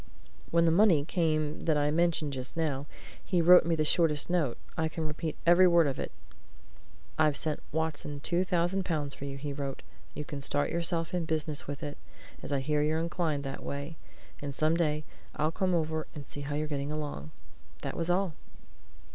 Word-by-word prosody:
When 170 Hz, 0 st, +4 dB
the 165 Hz, -, +4 dB
money 170 Hz, -5 st, +5 dB
came 155 Hz, -3 st, 0 dB
that 155 Hz, -2 st, +1 dB
I 145 Hz, 0 st, +2 dB
mentioned 160 Hz, -3 st, +1 dB
just 130 Hz, +4 st, -5 dB
now, 145 Hz, -3 st, -1 dB, 0.4 s
he 180 Hz, -, +1 dB
wrote 175 Hz, 0 st, +7 dB
me 170 Hz, -, +2 dB
the 155 Hz, -1 st, +1 dB
shortest 155 Hz, 0 st, +2 dB
note 155 Hz, -9 st, +1 dB, 0.2 s
I 160 Hz, 0 st, 0 dB
can 160 Hz, 0 st, -4 dB
repeat 155 Hz, +1 st, -4 dB
every 175 Hz, +2 st, +7 dB
word 170 Hz, -2 st, +5 dB
of 140 Hz, -2 st, -1 dB
it: -, -, -3 dB, 1.1 s
'I've 150 Hz, -2 st, +4 dB
sent 155 Hz, -2 st, +2 dB
Watson 150 Hz, -2 st, -2 dB
two 175 Hz, +5 st, +1 dB
thousand 180 Hz, +1 st, +1 dB
pounds 150 Hz, -6 st, -2 dB
for 140 Hz, -, -7 dB
you,' 140 Hz, 0 st, -5 dB
he 140 Hz, +1 st, -4 dB
wrote. 140 Hz, -1 st, -5 dB, 0.3 s
'You 150 Hz, -, -4 dB
can 140 Hz, 0 st, -6 dB
start 145 Hz, +1 st, 0 dB
yourself 170 Hz, 0 st, -1 dB
in 175 Hz, -2 st, 0 dB
business 155 Hz, -2 st, -1 dB
with 145 Hz, +2 st, -5 dB
it, 145 Hz, -1 st, -5 dB, 0.4 s
as -, -, -6 dB
I 140 Hz, -1 st, +1 dB
hear 150 Hz, +2 st, +1 dB
you're 155 Hz, +1 st, +1 dB
inclined 165 Hz, -3 st, -1 dB
that 135 Hz, -1 st, -5 dB
way, 140 Hz, +3 st, -5 dB, 0.5 s
and 140 Hz, -1 st, -4 dB
some 155 Hz, +3 st, +3 dB
day 155 Hz, -3 st, +1 dB, 0.3 s
I'll 155 Hz, +1 st, +1 dB
come 185 Hz, +1 st, +1 dB
over 160 Hz, -1 st, -1 dB
and 145 Hz, -2 st, -7 dB
see 145 Hz, -, -5 dB
how 145 Hz, +1 st, -3 dB
you're 155 Hz, +1 st, 0 dB
getting 145 Hz, -1 st, -3 dB
along.' 145 Hz, -, -4 dB, 0.5 s
That -, -, -3 dB
was 165 Hz, 0 st, -1 dB
all!" 180 Hz, -1 st, +1 dB
155 Hz, 195 wpm, -30 LUFS, 145-170 Hz, 1.1 s, wrote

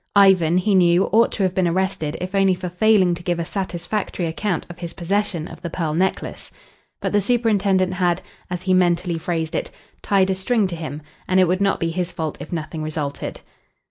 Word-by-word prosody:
Ivan, 185 Hz, -4 st, +5 dB
he 200 Hz, +3 st, +2 dB
knew, 175 Hz, -1 st, +5 dB
ought 230 Hz, +2 st, +4 dB
to 200 Hz, -, -1 dB
have 185 Hz, -1 st, +1 dB
been 185 Hz, -1 st, +2 dB
arrested 170 Hz, -3 st, -1 dB
if 185 Hz, +1 st, -5 dB
only 195 Hz, -1 st, +3 dB
for 180 Hz, 0 st, -5 dB
failing 185 Hz, 0 st, +3 dB
to 170 Hz, -, -5 dB
give 175 Hz, 0 st, -1 dB
a 170 Hz, -, -2 dB
satisfactory 185 Hz, 0 st, -3 dB
account 175 Hz, +2 st, -2 dB
of 175 Hz, 0 st, -11 dB
his 170 Hz, -1 st, -6 dB
possession 180 Hz, -2 st, -1 dB
of -, -, -11 dB
the 170 Hz, -, -4 dB
pearl 160 Hz, -2 st, -2 dB
necklace. 185 Hz, +4 st, -2 dB, 0.5 s
But -, -, -1 dB
the 205 Hz, -, +3 dB
superintendent 200 Hz, -5 st, +2 dB
had, 180 Hz, -1 st, 0 dB, 0.3 s
as 180 Hz, 0 st, -4 dB
he 185 Hz, 0 st, +2 dB
mentally 175 Hz, -1 st, +2 dB
phrased 160 Hz, -1 st, -2 dB
it, -, -, -2 dB, 0.3 s
"tied 195 Hz, -1 st, +2 dB
a -, -, +2 dB
string 215 Hz, +3 st, +1 dB
to 175 Hz, -, -4 dB
him," 155 Hz, -2 st, -6 dB, 0.2 s
and 185 Hz, 0 st, +3 dB
it 185 Hz, -, +5 dB
would 185 Hz, +3 st, 0 dB
not 195 Hz, -1 st, +2 dB
be 165 Hz, 0 st, -1 dB
his 180 Hz, +1 st, -2 dB
fault 160 Hz, -3 st, -4 dB
if -, -, -8 dB
nothing 160 Hz, -1 st, -4 dB
resulted. 155 Hz, -2 st, -4 dB
180 Hz, 205 wpm, -21 LUFS, 170-195 Hz, 0.5 s, Ivan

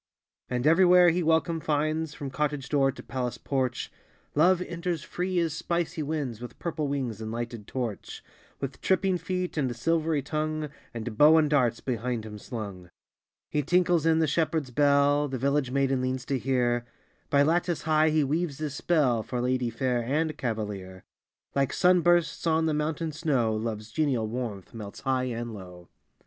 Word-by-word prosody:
And 125 Hz, +1 st, -1 dB
everywhere 180 Hz, +2 st, +6 dB
he 175 Hz, +2 st, 0 dB
welcome 165 Hz, 0 st, +2 dB
finds, 155 Hz, +1 st, -1 dB
From 140 Hz, -2 st, -6 dB
cottage 145 Hz, -3 st, -2 dB
door 135 Hz, -2 st, +3 dB
to 135 Hz, -, -11 dB
palace 125 Hz, -2 st, -3 dB
porch 130 Hz, -3 st, -2 dB, 0.4 s
Love 175 Hz, +4 st, +4 dB
enters 170 Hz, -2 st, -3 dB
free 180 Hz, +1 st, -3 dB
as 165 Hz, -3 st, +1 dB
spicy 170 Hz, 0 st, -2 dB
winds, 140 Hz, -7 st, -3 dB
With 125 Hz, -, -8 dB
purple 160 Hz, -3 st, -2 dB
wings 130 Hz, -6 st, -3 dB
and 110 Hz, 0 st, -4 dB
lighted 115 Hz, -2 st, -5 dB
torch, 120 Hz, -6 st, -5 dB, 0.4 s
With 135 Hz, -1 st, -5 dB
tripping 190 Hz, -1 st, +2 dB
feet 180 Hz, -2 st, -3 dB
and 130 Hz, -5 st, 0 dB
silvery 160 Hz, +2 st, 0 dB
tongue, 155 Hz, +1 st, -2 dB, 0.2 s
And 110 Hz, -2 st, -6 dB
bow 155 Hz, +2 st, +8 dB
and 155 Hz, -1 st, +4 dB
darts 125 Hz, -6 st, +2 dB
behind 120 Hz, -2 st, -2 dB
him 105 Hz, -1 st, -8 dB
slung. 100 Hz, -7 st, -7 dB, 0.6 s
He 150 Hz, -, +1 dB
tinkles 175 Hz, +1 st, +2 dB
in 160 Hz, -1 st, +4 dB
the 160 Hz, -, +3 dB
shepherd 160 Hz, +1 st, +1 dB
s 130 Hz, -, -13 dB
bell 145 Hz, +2 st, +3 dB
The 130 Hz, -2 st, -3 dB
village 140 Hz, +1 st, +1 dB
maiden 135 Hz, 0 st, +1 dB
leans 130 Hz, 0 st, -2 dB
to 135 Hz, -1 st, -1 dB
hear 120 Hz, -2 st, +1 dB, 0.5 s
By 140 Hz, 0 st, +4 dB
lattice 170 Hz, +1 st, +1 dB
high 155 Hz, 0 st, +3 dB
he 155 Hz, -1 st, +2 dB
weaves 150 Hz, +1 st, -1 dB
his 155 Hz, -3 st, -3 dB
spell, 145 Hz, -7 st, +2 dB
For 125 Hz, +3 st, -4 dB
lady 125 Hz, 0 st, 0 dB
fair 125 Hz, +1 st, 0 dB
and 155 Hz, +5 st, 0 dB
cavalier: 105 Hz, -7 st, -4 dB, 0.5 s
Like 140 Hz, -1 st, +1 dB
sun 180 Hz, 0 st, +4 dB
bursts 175 Hz, 0 st, +2 dB
on 160 Hz, 0 st, +3 dB
the 160 Hz, -, +1 dB
mountain 155 Hz, +2 st, -1 dB
snow, 140 Hz, -8 st, 0 dB
Love 110 Hz, -1 st, -3 dB
s 110 Hz, +1 st, -14 dB
genial 130 Hz, -6 st, 0 dB
warmth 110 Hz, -5 st, -5 dB
melts 105 Hz, -3 st, -8 dB
high 130 Hz, -1 st, 0 dB
and 120 Hz, -2 st, -4 dB
low. 90 Hz, -3 st, -11 dB
140 Hz, 175 wpm, -27 LUFS, 120-160 Hz, 0.6 s, bow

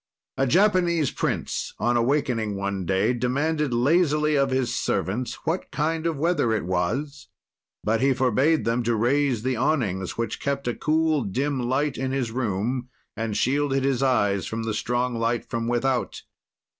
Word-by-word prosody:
"A 135 Hz, -, +1 dB
Japanese 175 Hz, -, +3 dB
prince, -, -, -2 dB
on 120 Hz, 0 st, +1 dB
awakening, 120 Hz, -4 st, +1 dB
one 100 Hz, -2 st, -3 dB
day, 95 Hz, +6 st, +2 dB
demanded 140 Hz, +4 st, 0 dB
lazily 150 Hz, +4 st, +2 dB
of 140 Hz, -1 st, +2 dB
his 130 Hz, -2 st, 0 dB
servants 105 Hz, +3 st, -1 dB
what 165 Hz, +4 st, -2 dB
kind 160 Hz, +2 st, -1 dB
of 165 Hz, -3 st, -1 dB
weather 160 Hz, -7 st, +1 dB
it 110 Hz, -, -1 dB
was, 115 Hz, +12 st, -2 dB, 0.6 s
but 110 Hz, +2 st, +1 dB
he 135 Hz, +1 st, +4 dB
forbade 130 Hz, +5 st, +2 dB
them 115 Hz, +2 st, +1 dB
to 120 Hz, 0 st, 0 dB
raise 125 Hz, +1 st, +1 dB
the 130 Hz, 0 st, 0 dB
awnings 110 Hz, -, -1 dB
which 115 Hz, -2 st, -2 dB
kept 140 Hz, -2 st, -2 dB
a 120 Hz, -, +1 dB
cool, 155 Hz, +1 st, +1 dB
dim 130 Hz, +6 st, -1 dB
light 140 Hz, +2 st, 0 dB
in 130 Hz, 0 st, -1 dB
his 130 Hz, -4 st, -1 dB
room 120 Hz, +2 st, -2 dB, 0.3 s
and 110 Hz, -1 st, -2 dB
shielded 135 Hz, 0 st, +1 dB
his 135 Hz, -2 st, +1 dB
eyes 105 Hz, -7 st, +2 dB
from 115 Hz, +1 st, -3 dB
the 110 Hz, -1 st, -2 dB
strong 120 Hz, +3 st, -1 dB
light 115 Hz, +1 st, -1 dB
from 115 Hz, 0 st, -3 dB
without. 120 Hz, +1 st, -1 dB
130 Hz, 160 wpm, -25 LUFS, 115-145 Hz, 0.6 s, he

